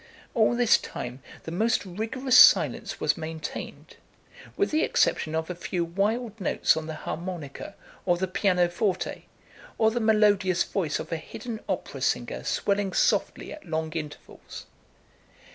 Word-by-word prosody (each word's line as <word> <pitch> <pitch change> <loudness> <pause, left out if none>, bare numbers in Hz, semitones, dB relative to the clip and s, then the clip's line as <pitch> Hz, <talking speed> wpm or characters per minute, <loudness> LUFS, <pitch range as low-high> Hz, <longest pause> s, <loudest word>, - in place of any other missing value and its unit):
All 225 +1 +3
this 240 -2 +4
time 125 +2 -7 0.2
the 165 - -6
most 220 +5 +1
rigorous 225 +8 -1
silence - - +6
was - - +1
maintained, 160 0 -7 0.6
with 400 - +1
the 310 +1 +2
exception 155 0 +1
of 160 0 -1
a 180 - -4
few 175 0 -3
wild 210 +5 -2
notes - - +2
on 160 0 -4
the 160 - -5
harmonica 170 +1 -6 0.3
or 175 -1 +2
the 190 +2 -1
piano 180 -1 +2
forte, 185 +2 -2 0.5
or 220 0 +3
the 240 - -1
melodious 205 -5 +3
voice 170 -7 -2
of 155 - -7
a 165 - 0
hidden 220 +8 -7
opera - - -3
singer - - -1
swelling 200 -1 0
softly - - +1
at 305 - -12
long 160 0 -2
intervals. 150 -3 -8
185 Hz, 145 wpm, -26 LUFS, 165-220 Hz, 0.6 s, silence